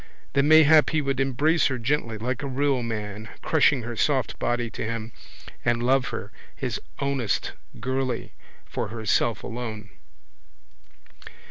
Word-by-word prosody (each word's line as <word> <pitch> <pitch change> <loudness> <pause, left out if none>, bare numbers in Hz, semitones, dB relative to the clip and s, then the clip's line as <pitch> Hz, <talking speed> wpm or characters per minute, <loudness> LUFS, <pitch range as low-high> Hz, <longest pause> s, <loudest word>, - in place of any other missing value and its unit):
Then 140 +1 +3
mayhap 155 0 +7
he 155 - +1
would 135 -2 -1
embrace 140 +5 +2
her 130 - -1
gently, 120 -2 -1
like 125 +4 -2
a 140 - -3
real 135 -1 +1
man, 105 -2 -5
crushing 145 -5 +3
her 120 +1 -5
soft 135 +2 0
body 120 -1 0
to - - -5
him, 115 0 -4 0.5
and 120 0 +1
love 130 +1 +3
her, - - -5 0.2
his - - -3 0.2
ownest 140 -6 -1 0.3
girlie, 130 0 -2 0.3
for - - -3
herself 110 0 0
alone. 110 -4 -6
125 Hz, 135 wpm, -25 LUFS, 115-140 Hz, 0.5 s, mayhap